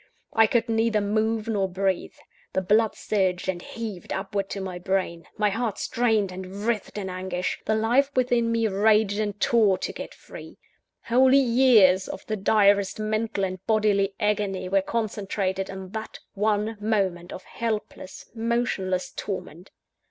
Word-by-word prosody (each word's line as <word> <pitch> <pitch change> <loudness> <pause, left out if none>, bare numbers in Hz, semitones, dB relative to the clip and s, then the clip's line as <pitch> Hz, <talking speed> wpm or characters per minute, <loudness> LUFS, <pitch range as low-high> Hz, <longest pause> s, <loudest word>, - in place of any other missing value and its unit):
I 225 -1 +5
could 230 +1 +1
neither 225 -1 +2
move 215 +2 0
nor 200 -4 0
breathe. 190 0 -1 0.4
The 190 - +1
blood 215 +3 +3
surged 185 -4 -1
and 180 -2 -2
heaved 215 -5 -7
upward 195 0 -3
to 200 - -4
my 185 -2 -5
brain; 180 -3 -2
my 210 -1 +2
heart 225 0 -2
strained 220 -5 +1
and 190 +3 -7
writhed 230 -3 -2
in 200 -2 -3
anguish; 185 0 -3
the 220 - +2
life 240 +6 +2
within 245 -2 +2
me 230 -1 +1
raged 210 0 +2
and 205 -1 -2
tore 215 -5 +3
to - - -4
get - - -8
free. - - -12 0.5
Whole 255 +2 +4
years 235 -8 +5
of - - -7
the 215 - -2
direst 200 0 +3
mental 215 -1 -1
and 185 -1 -3
bodily 205 -3 +2
agony 205 -3 -1
were 195 +1 +2
concentrated 195 -3 -2
in 190 -1 -7
that 220 0 -6 0.2
one 210 +1 0
moment 190 -5 -1
of 185 - -8
helpless, 215 -4 -5
motionless 225 -6 -1
torment. 180 -3 -6
205 Hz, 150 wpm, -25 LUFS, 190-225 Hz, 0.5 s, I